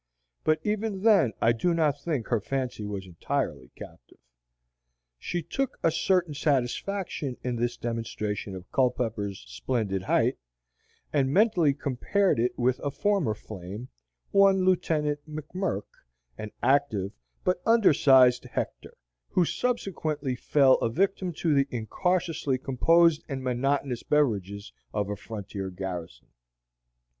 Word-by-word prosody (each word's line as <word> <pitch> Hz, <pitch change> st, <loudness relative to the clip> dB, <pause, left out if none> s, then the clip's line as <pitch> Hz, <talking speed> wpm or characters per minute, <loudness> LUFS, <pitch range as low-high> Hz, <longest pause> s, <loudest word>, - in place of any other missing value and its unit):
But 155 Hz, 0 st, +2 dB
even 210 Hz, -2 st, -2 dB
then 200 Hz, -, +5 dB
I 115 Hz, -, +5 dB
do 165 Hz, +9 st, +1 dB
not 150 Hz, -3 st, +1 dB
think 145 Hz, -8 st, -2 dB
her 115 Hz, -, +2 dB
fancy 130 Hz, -2 st, -3 dB
was 100 Hz, -2 st, -5 dB
entirely 85 Hz, -7 st, -3 dB
captive. -, -, -13 dB, 1.0 s
She 175 Hz, -, -3 dB
took 270 Hz, -, -3 dB
a 165 Hz, -, +4 dB
certain 175 Hz, -1 st, +1 dB
satisfaction 145 Hz, +2 st, -1 dB
in 125 Hz, -1 st, -1 dB
this 120 Hz, +1 st, -1 dB
demonstration 110 Hz, -4 st, -4 dB
of 90 Hz, -1 st, -11 dB
Culpepper's 110 Hz, -, -1 dB
splendid 95 Hz, -, -2 dB
height, 95 Hz, -, +1 dB, 0.7 s
and 135 Hz, -3 st, +2 dB
mentally 180 Hz, -7 st, +3 dB
compared 150 Hz, -, 0 dB
it 120 Hz, +2 st, 0 dB
with 125 Hz, +1 st, +1 dB
a 145 Hz, -, -2 dB
former 185 Hz, -, 0 dB
flame, 105 Hz, +3 st, -8 dB, 0.4 s
one 195 Hz, -1 st, +5 dB
lieutenant 155 Hz, -5 st, +1 dB
McMirk, 155 Hz, -, -3 dB, 0.5 s
an 110 Hz, -, -6 dB
active, 125 Hz, -7 st, +2 dB, 0.3 s
but 180 Hz, -1 st, 0 dB
under 225 Hz, -7 st, +5 dB
sized 130 Hz, -3 st, +5 dB
Hector, -, -, -5 dB, 0.3 s
who 180 Hz, -, +2 dB
subsequently 160 Hz, -, -2 dB
fell 135 Hz, +1 st, +4 dB
a -, -, 0 dB
victim 190 Hz, +6 st, 0 dB
to 160 Hz, 0 st, 0 dB
the 140 Hz, -1 st, +3 dB
incautiously 160 Hz, -, -1 dB
composed 165 Hz, +5 st, +3 dB
and 135 Hz, -2 st, -4 dB
monotonous 130 Hz, 0 st, 0 dB
beverages 100 Hz, -9 st, 0 dB, 0.2 s
of 105 Hz, -1 st, -1 dB
a -, -, -2 dB
frontier 100 Hz, -2 st, -6 dB
garrison. 90 Hz, -8 st, -7 dB
135 Hz, 125 wpm, -27 LUFS, 110-170 Hz, 1.0 s, then